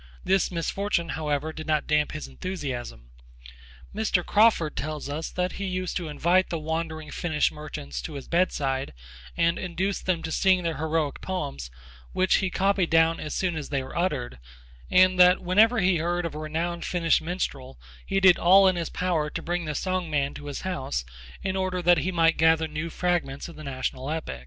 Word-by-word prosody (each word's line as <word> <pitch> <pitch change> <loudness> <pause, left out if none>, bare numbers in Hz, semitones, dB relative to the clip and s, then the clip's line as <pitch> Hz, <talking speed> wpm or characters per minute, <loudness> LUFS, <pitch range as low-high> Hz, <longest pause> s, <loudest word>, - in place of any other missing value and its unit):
This 190 0 +2
misfortune, 170 0 -1
however, 155 0 -2
did 155 0 -8
not 155 -1 +1
damp 150 -1 +1
his 155 - -5
enthusiasm. 125 - -6 0.8
Mr. 205 -4 0
Crawford 205 -8 +3
tells 155 0 -4
us 150 +3 -4
that 180 0 -2
he 200 - -5
used 185 -1 -3
to 175 -3 -4
invite 175 +5 +2
the 170 - -2
wandering 160 0 -4
Finnish 155 -3 0
merchants 70 - -7
to - - -7
his 140 -2 -7
bedside 140 - 0 0.4
and 170 0 +2
induce 185 +2 -2
them 180 -3 -1
to 160 - -4
sing 185 +1 +3
their 165 -3 -2
heroic 155 -1 -1
poems 70 - -4 0.4
which 185 0 +3
he 190 - 0
copied 195 -1 +1
down 165 0 +3
as 155 - -5
soon 180 -3 0
as 150 -3 -5
they 140 -2 -1
were 130 - -10
uttered, 150 - -2 0.5
and 185 0 +5
that 180 0 +7
whenever 215 +7 +4
he 180 -1 +3
heard 175 +2 -1
of 165 - -4
a 150 - -6
renowned 165 +3 -3
Finnish 170 -2 +2
minstrel 145 - -4 0.2
he 195 - 0
did 185 -2 +6
all 190 +3 +7
in 185 -1 +2
his 170 -2 -2
power 165 -4 -1
to - - -6
bring 175 0 -2
the 150 -1 -3
song 185 +1 -2
man 140 -2 0
to 145 - -9
his 145 - -5
house 130 - -3 0.4
in 190 0 -1
order 185 -1 -1
that 175 -1 +4
he 185 - -1
might 165 -2 +3
gather 160 0 +4
new 155 +2 -4
fragments 170 -6 -1
of 170 - -11
the 155 - -10
national 130 -1 -4
epic. 155 - -4
165 Hz, 190 wpm, -26 LUFS, 150-185 Hz, 0.8 s, that